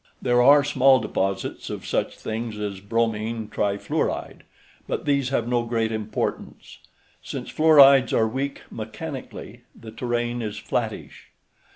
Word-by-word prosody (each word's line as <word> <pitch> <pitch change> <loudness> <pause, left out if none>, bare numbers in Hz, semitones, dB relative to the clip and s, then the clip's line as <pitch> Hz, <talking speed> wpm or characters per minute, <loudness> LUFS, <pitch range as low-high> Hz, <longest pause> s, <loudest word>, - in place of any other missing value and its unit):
There 120 0 +2
are 140 +3 +7
small 135 -1 +4
deposits 95 -3 -3
of - - -6
such - - -2
things 110 0 -5
as 100 -2 -4
bromine 110 +1 -2
trifluoride, 100 -1 -2 0.5
but - - -3
these 140 -3 +1
have 120 -4 -1
no 120 -1 +1
great 115 -1 -1
importance. 110 -1 -4 0.4
Since - - -6
fluorides 140 -4 +6
are 110 - +2
weak 135 +5 -4
mechanically, - - -8 0.2
the 110 - -10
terrain 120 +1 -2
is 105 -2 -4
flattish. - - -4
115 Hz, 130 wpm, -24 LUFS, 110-130 Hz, 0.5 s, are